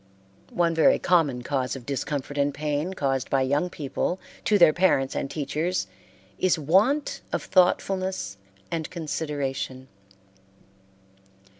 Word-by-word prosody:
One 170 -1 +2
very 160 -1 +5
common 150 -9 +2
cause 130 -1 -1
of 130 -3 -9
discomfort 140 +1 -3
and 145 0 +1
pain 150 +5 -2
caused 135 -5 -1
by 135 -1 +2
young 145 +7 +1
people 160 +4 -3 0.3
to 210 - +4
their 170 -5 +7
parents 160 -7 +2
and 135 - -2
teachers 155 - -2 0.5
is 185 -2 +3
want 200 - +2
of - - -2
thoughtfulness 185 - +1 0.3
and 160 -2 -2
consideration. 145 -5 -4
150 Hz, 120 wpm, -25 LUFS, 135-180 Hz, 0.5 s, their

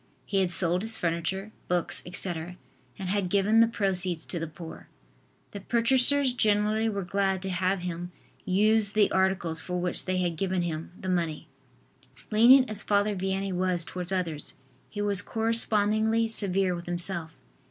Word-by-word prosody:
He 195 - 0
had 185 -2 +1
sold 175 +1 +2
his 225 +1 0
furniture, 180 +5 -2 0.2
books, 175 -1 0
etc., 175 -1 -4 0.4
and 190 - -5
had 195 -2 -1
given 205 +3 +3
the 230 - +6
proceeds 185 -6 0
to 175 - -3
the 165 - -4
poor. 160 +1 -11 0.6
The 200 - -7
purchasers 255 +4 +3
generally 215 -1 +1
were 200 -2 -3
glad 195 +1 0
to 190 - -3
have 185 +1 0
him 175 0 -5 0.3
use 210 +2 +3
the 210 -1 +3
articles 190 -4 0
for 180 0 -4
which 180 0 0
they 185 0 -1
had 175 -3 -1
given 185 -1 -1
him 165 -1 -4
the 190 - -7
money. 170 -4 -2 0.8
Lenient 250 +5 +6
as 215 -1 -5
Father 205 0 +1
Vianney 190 +1 -2
was 180 -2 +1
towards 180 0 -5
others, 170 -5 -2 0.3
he 205 -1 -4
was 200 -2 +1
correspondingly 220 0 0
severe 195 -4 +2
with 175 0 -7
himself. 175 -2 -1
190 Hz, 160 wpm, -27 LUFS, 175-210 Hz, 0.8 s, the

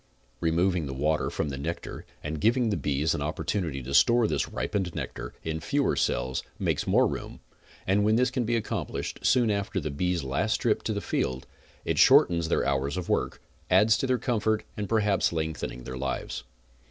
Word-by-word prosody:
Removing 85 0 +1
the 65 - -5
water 75 +3 +1
from 75 - -2
the 70 -1 -5
nectar 85 +4 -5 0.2
and 75 0 -4
giving 120 0 +3
the - - +1
bees 75 0 0
an - - -3
opportunity 80 -10 -2
to 65 +3 -6
store 120 - +5
this - - 0
ripened 95 -4 -2
nectar - - -5
in 80 0 -3
fewer 140 - +1
cells 65 +2 0 0.2
makes - - -1
more - - +4
room, - - -4 0.5
and 100 +2 +2
when 110 +1 +3
this 125 +1 +2
can 125 -1 0
be 120 +1 0
accomplished 115 - -3
soon 120 -4 +3
after 100 -1 -1
the 75 -3 -4
bees' 90 +2 -1
last 70 +12 0
trip 115 -3 +1
to 110 - 0
the 100 - -3
field, 65 -7 -2 0.4
it - - 0
shortens 85 -1 +6
their - - +1
hours 70 +3 0
of 90 - -4
work, - - -1 0.3
adds 110 +1 +5
to 135 - 0
their 130 -1 +2
comfort 110 -3 0
and 105 -2 -4
perhaps 105 -3 +2
lengthening 80 -6 -3
their 65 +1 -6
lives. 65 0 -3
90 Hz, 190 wpm, -27 LUFS, 75-110 Hz, 0.5 s, shortens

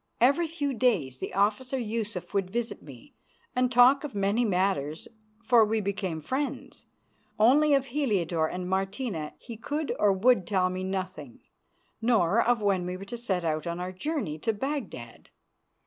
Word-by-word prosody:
Every 280 +8 +4
few 290 -4 -2
days 190 - +1
the - - -5
officer 215 +7 +1
Yusuf 215 -6 -4
would 195 -2 0
visit 235 +3 -3
me - - -14 0.4
and 250 0 +2
talk 255 +3 +6
of 290 -7 -6
many 200 +4 +1
matters, 180 -7 0 0.4
for 235 -1 +5
we 220 +1 +1
became 195 -5 -3
friends. 270 - -4 0.5
Only 285 +7 +5
of 270 -1 +1
Heliodore 195 - 0
and 180 0 -5
Martina 190 - -2
he 230 -2 -10
could 295 +6 -3
or 205 - +4
would 195 0 +3
tell 185 -3 +1
me 185 0 -4
nothing, 185 -9 -5 0.6
nor 225 -3 +3
of 240 -2 +1
when 195 -3 +2
we 180 0 -4
were 195 - -9
to 220 - -6
set 195 -7 -2
out 155 0 -1
on 170 +1 -3
our 180 +1 -4
journey 190 - -3
to 225 - 0
Baghdad. 215 - -5
205 Hz, 165 wpm, -28 LUFS, 185-250 Hz, 0.6 s, talk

